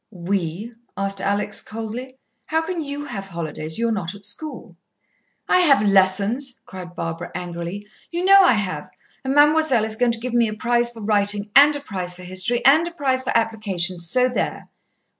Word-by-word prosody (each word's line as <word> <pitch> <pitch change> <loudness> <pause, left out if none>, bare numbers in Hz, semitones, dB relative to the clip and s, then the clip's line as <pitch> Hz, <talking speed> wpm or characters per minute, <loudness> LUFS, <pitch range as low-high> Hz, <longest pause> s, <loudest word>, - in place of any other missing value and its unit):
"We?" 190 +2 -4 0.2
asked 195 0 -1
Alex 205 +1 -1
coldly. 225 +4 -7 0.3
"How 320 +1 0
can 335 -1 -4
you 285 0 -6
have 195 -8 -6
holidays? 160 -3 -5
You're 230 0 0
not 195 -3 -3
at 200 0 -12
school." 270 - -6 0.7
"I - - +4
have 275 -12 +4
lessons," 200 +7 +2
cried 185 -6 -10
Barbara 165 +1 -5
angrily. 175 +3 -6 0.2
"You 350 +1 -3
know 390 0 +7
I 360 - +5
have, 200 -4 -3 0.3
and 265 +1 -2
Ma'moiselle 295 -5 +4
is 220 0 -2
going 240 +1 +1
to 230 - -3
give 245 +1 -5
me 235 -1 +3
a 215 - -5
prize 240 +1 +2
for 230 -2 -10
writing, 205 0 +1
and 290 +2 +7
a 290 - -5
prize 185 -8 -2
for 180 - -11
history, 185 +7 0
and 310 +5 +5
a - - -6
prize 270 -6 0
for 260 - 0
application. 200 -6 +1
So 250 +10 +1
there!" 250 - -4
220 Hz, 180 wpm, -21 LUFS, 190-260 Hz, 0.7 s, know